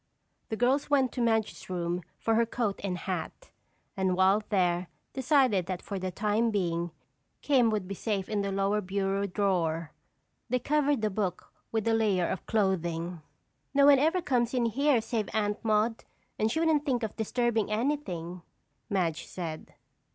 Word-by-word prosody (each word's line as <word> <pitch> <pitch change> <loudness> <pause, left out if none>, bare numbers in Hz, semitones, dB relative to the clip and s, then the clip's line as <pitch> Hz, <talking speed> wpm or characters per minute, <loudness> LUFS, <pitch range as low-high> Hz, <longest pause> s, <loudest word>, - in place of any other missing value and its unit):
The 220 - -2
girls 260 +5 +2
went 270 -3 +3
to 250 - -3
Madge's 225 -4 0
room 175 -1 -2 0.2
for 225 - 0
her 230 +1 +3
coat 225 -4 -2
and 185 -3 -2
hat 185 - -5 0.4
and 190 -1 +1
while 190 +3 +4
there 180 -3 +1 0.3
decided 255 - +3
that 185 -1 -4
for 200 -2 -4
the 185 0 -2
time 210 +5 +1
being 175 -5 -1 0.5
"Kim" 255 -5 +4
would 210 -4 -1
be 195 - -4
safe 195 -1 -2
in 210 -2 -1
the 200 0 -2
lower 195 +2 +1
bureau 195 +1 -1
drawer. 170 -5 0 0.6
They 250 - +2
covered 285 -1 +1
the 215 - +1
book 190 -3 -3 0.2
with 220 -1 -1
a 225 - +3
layer 205 -6 +2
of 190 - -4
clothing. 175 -5 0 0.5
"No 280 0 +6
one 285 -2 +7
ever 325 +5 +2
comes 245 -3 +1
in 245 -2 +2
here 260 +2 +2
save 220 -2 -2
Aunt 210 0 0
Maude 220 +1 +1 0.4
and 215 +1 +2
she 320 - 0
wouldn't 320 -3 +3
think 255 -5 0
of 220 - -3
disturbing 225 -1 0
anything," 205 - -2 0.5
Madge 175 -5 -1
said. 165 -4 -6
210 Hz, 165 wpm, -29 LUFS, 185-240 Hz, 0.6 s, one